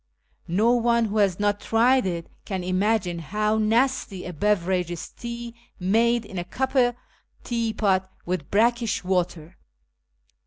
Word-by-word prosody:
No 205 +7 +3
one 235 -1 +3
who 215 0 -2
has 195 -3 +2
not 205 0 +1
tried 240 +1 +3
it 170 -2 -3 0.2
can 190 -3 -4
imagine 185 -1 0
how 210 +6 0
nasty 225 -3 +1
a 180 - -6
beverage 185 -1 +1
is 175 -2 -5
tea 235 0 -7 0.3
made 230 +5 +2
in 190 -3 -6
a - - -2
copper 255 +4 +1 0.5
teapot 215 -5 0 0.2
with 175 -5 -3
brackish 230 0 +2
water. 180 -2 -2
210 Hz, 130 wpm, -25 LUFS, 185-235 Hz, 0.5 s, No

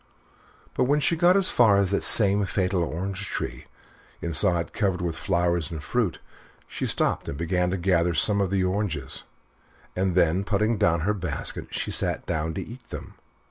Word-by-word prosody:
But - - +1
when 145 +3 +2
she 165 - +1
got 175 +3 +4
as 195 -2 +2
far 110 -5 +4
as 100 -1 +1
the 100 - +1
same 100 -2 +5
fatal 90 -1 0
orange 95 +5 -4
tree, - - -5 0.5
and 85 -1 -3
saw 90 -2 +5
it 85 - -4
covered 95 -4 0
with 85 -2 -3
flowers 85 -3 0
and 80 -2 -7
fruit, 115 -8 -1 0.5
she - - -4
stopped - - 0
and 70 - -5
began 90 +2 0
to 95 - -2
gather 85 -2 +1
some 100 +4 +3
of 95 - 0
the 95 -1 0
oranges 90 -8 -3 0.7
and 95 -1 0
then, 90 +1 +2
putting 105 +1 0
down 85 0 +2
her 105 +5 +1
basket, 85 -8 -3
she - - -4
sat - - -1
down 80 +1 -2
to - - -4
eat 120 +2 -12
them. - - -9
95 Hz, 185 wpm, -25 LUFS, 85-105 Hz, 0.7 s, same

